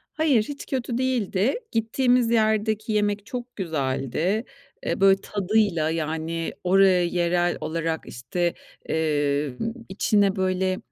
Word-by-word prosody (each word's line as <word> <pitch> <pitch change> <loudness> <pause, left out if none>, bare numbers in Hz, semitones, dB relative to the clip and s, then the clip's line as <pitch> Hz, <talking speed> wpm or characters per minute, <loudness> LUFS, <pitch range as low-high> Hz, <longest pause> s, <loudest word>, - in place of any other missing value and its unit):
Hayır, 285 -9 +3
hiç 285 +4 -7
kötü 250 -3 -2
değildi. 245 -3 +1 0.2
Gittiğimiz 240 +1 +2
yerdeki 220 -1 +1
yemek 205 -1 0
çok 245 0 -7
güzeldi. 160 - -1 0.4
E, - - -1
böyle, 195 0 +5
tadıyla, 200 -5 +1
yani, 160 +1 -2
oraya 185 0 +5
yerel 175 0 +1
olarak, 165 0 -2
işte, 170 +9 -2 0.4
eee, 145 -3 0 0.4
içine 200 0 +2
böyle 185 0 0
190 Hz, 110 wpm, -24 LUFS, 165-220 Hz, 0.4 s, böyle